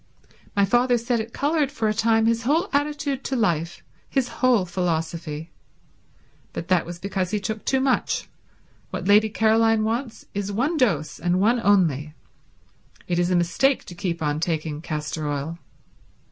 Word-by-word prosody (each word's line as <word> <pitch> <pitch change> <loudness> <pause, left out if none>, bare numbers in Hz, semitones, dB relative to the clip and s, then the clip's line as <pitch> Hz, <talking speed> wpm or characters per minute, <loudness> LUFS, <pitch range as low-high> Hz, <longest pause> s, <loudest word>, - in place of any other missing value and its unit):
My 200 -1 +4
father 245 +4 +3
said 235 0 0
it 220 +1 -5
coloured 290 0 0
for 225 -4 -1
a 215 - +2
time 225 0 +2
his 230 0 +2
whole 315 - +1
attitude 290 -1 -1
to 265 - -1
life, 175 -7 0 0.3
his 265 -3 0
whole 245 -7 +2
philosophy. 165 -2 -3 1.0
But 170 - -6
that 180 -3 +2
was 175 0 -6
because 190 -1 -2
he 210 +1 -1
took 215 +2 -4
too 265 - +2
much. 260 -1 0 0.6
What - - -4
Lady 210 +2 +5
Caroline 225 0 +3
wants 230 0 -3
is 200 0 -3
one 265 - 0
dose, 175 - 0
and 175 +3 +1
one 230 +5 +3
only. 155 -7 +2 0.9
It 175 -1 0
is 175 0 +2
a 180 - +2
mistake 180 +11 +2
to - - -9
keep 170 -2 -3
on 150 0 0
taking 155 -2 -2
castor 150 -1 -4
oil." 145 +4 -3
205 Hz, 160 wpm, -24 LUFS, 170-240 Hz, 1.0 s, Lady